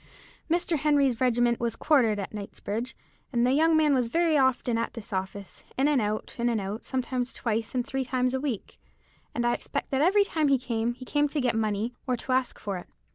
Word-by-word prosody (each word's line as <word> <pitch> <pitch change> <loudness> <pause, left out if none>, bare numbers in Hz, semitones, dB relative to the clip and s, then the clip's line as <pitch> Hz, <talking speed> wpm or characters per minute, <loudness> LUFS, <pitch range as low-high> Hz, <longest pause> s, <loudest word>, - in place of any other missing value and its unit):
Mr. 340 0 +1
Henry's 280 -5 +2
regiment 240 -1 +3
was 235 -2 -1
quartered 245 -9 +3
at 195 0 -5
Knightsbridge, 215 +4 -5 0.3
and 240 -2 +2
the 250 - +3
young 320 +2 +4
man 305 -2 +4
was 250 -3 +2
very 330 +5 +2
often 260 -3 +2
at 230 0 -1
this 225 -2 -8
office, 190 0 -5
in 270 +2 +3
and 290 -4 +3
out, 210 0 -2
in 240 +1 +2
and 230 -2 +1
out, 200 +3 -5
sometimes 255 -1 -2
twice 225 0 -2
and 245 -1 0
three 270 -1 -2
times 255 0 0
a 265 - -1
week; 265 -8 -4 0.6
and 240 - 0
I 240 - +3
expect - - -4
that 270 0 +1
every 390 +6 +5
time 315 -6 0
he 275 -1 +4
came, 240 -2 -2
he 255 +1 -10
came 295 +2 +2
to 295 +1 -2
get 250 -3 +1
money, 220 +1 -1
or 250 -1 +1
to 255 - -5
ask 255 -1 +1
for 195 -3 -4
it. - - -12
250 Hz, 220 wpm, -27 LUFS, 225-275 Hz, 0.6 s, every